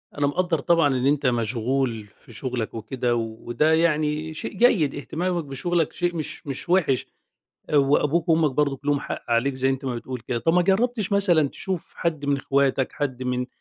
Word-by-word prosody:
أنا 145 -1 +1
مقدرّ 170 +1 0
طبعًا 165 0 +3
إن 130 -1 0
أنت 145 0 +2
مشغول 120 -1 -1
في 120 - -16
شغلك 120 -1 -4
وكده، 120 +2 -2
وده 120 +6 0
يعني 155 -1 +1
شيء 155 - -5
جيد 190 - +3
اهتمامك 170 +4 -2
بشغلك 165 +4 -1
شيء 175 -1 -1
مش 155 -2 -5
مش 140 +6 -5
وحش، 165 -8 +2 0.7
آآ 150 - +2
وأبوك 145 +4 +2
وأمك 160 -3 +4
برضك 140 0 -1
لهم 145 -1 +1
حق - - -5
عليك 120 +4 +1
زي 130 +1 0
أنت 135 +1 -3
ما 125 -2 -2
بتقول 125 +1 -6
كده، 120 +1 -3
طب 165 +7 +1
ما 180 - +5
جربتش 210 +2 +1
مثلًا 175 -7 +3
تشوف 185 +2 -5
حد 155 -4 -2
من 140 0 +2
إخواتك، 135 -1 +1
حد 130 -3 -3
من 125 0 -1
145 Hz, 180 wpm, -24 LUFS, 130-165 Hz, 0.7 s, ما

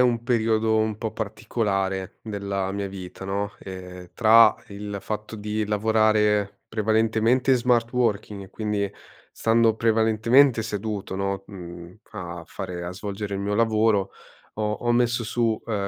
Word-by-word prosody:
un 120 -2 +3
periodo 110 -2 +2
un 110 -1 0
po' 110 -1 -3
particolare 100 -3 -2
della 100 -3 -3
mia 100 0 -3
vita, 95 -1 -8
no, 100 +1 -2
ehm, 90 -1 -9
tra 115 0 +6
il 100 0 -6
fatto 105 +1 -5
di 105 +1 -2
lavorare 105 -1 +2
prevalentemente 110 +4 +2
in - - +5
smart 120 -1 +2
working 105 -4 -1
e 95 - -12
quindi 105 -2 -2 0.4
stando 115 0 +3
prevalentemente 115 +3 +4
seduto, 105 -2 -4
no, 100 0 -2
mhmm, 85 -1 -10
a 85 -4 -6
fare 90 -1 -6
a 85 - -4
svolgere 100 +1 -5
il 100 - -3
mio 100 +1 -1
lavoro, 110 -3 +2 0.4
ho 105 0 -1
ho 120 +2 0
messo 120 0 +2
su, 115 -1 0
uhm, 115 - -3
105 Hz, 145 wpm, -24 LUFS, 100-115 Hz, 0.4 s, tra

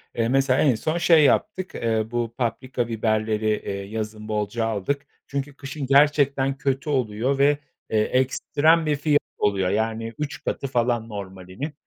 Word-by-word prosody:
Eee, 115 -1 +1
mesela 135 0 +3
en 135 -6 +4
son 155 +9 -2
şey 165 -2 +5
yaptık. 185 +5 +1
Eee, 110 -1 0
bu 120 -1 -2
paprika 125 0 -2
biberleri, 110 -1 0
eee, 100 -2 -2
yazın 110 0 -5
bolca 110 +2 -1
aldık. 115 +6 -2 0.2
Çünkü 140 0 -4
kışın 140 +1 -6
gerçekten 140 -1 +3
kötü 135 +2 -1
oluyor 130 0 0
ve, 140 +1 +4 0.3
eee, 110 - +2
ekstrem 145 +7 +2
bir 150 -1 +1
fiyatı 145 +1 +2 0.2
oluyor. 95 -3 +1
Yani, 110 +2 -1
3 150 -2 -5
katı 135 - -2
falan 120 -3 0
normalinin, 95 - -7
125 Hz, 150 wpm, -24 LUFS, 110-140 Hz, 0.3 s, şey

